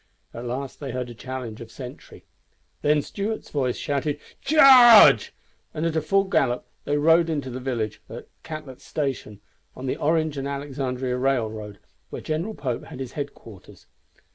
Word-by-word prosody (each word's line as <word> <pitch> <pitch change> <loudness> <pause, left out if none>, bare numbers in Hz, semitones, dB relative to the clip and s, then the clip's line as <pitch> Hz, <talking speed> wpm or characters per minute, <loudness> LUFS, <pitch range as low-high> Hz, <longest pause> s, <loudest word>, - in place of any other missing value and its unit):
At 120 +1 -7
last 130 +3 -5
they 140 - -6
heard 125 -1 -4
a - - -8
challenge 125 -2 -7
of 115 - -9
sentry. 125 +1 -11 0.6
Then 150 0 +2
Stuart's 215 +2 -5
voice 130 -4 -1
shouted, 145 -1 -2 0.2
"Charge!" 260 -6 +8 0.4
and 155 +1 -2
at 160 -2 0
full 195 +5 +3
gallop 135 -10 0 0.2
they 145 - 0
rode 165 +3 +4
into 145 -5 -3
the 125 - -5
village 120 -5 -3
at - - -9
Catlet's 155 -5 -9
Station 130 -8 -4 0.3
on 130 - -7
the 130 - -2
Orange 155 -1 0
and 135 - -3
Alexandria 135 -3 -3
railroad, 110 -6 -2 0.3
where - - -6
General 170 +8 -3
Pope 125 -4 -4
had - - -10
his 130 -3 -5
headquarters. 115 - -9
135 Hz, 155 wpm, -24 LUFS, 125-155 Hz, 0.6 s, Charge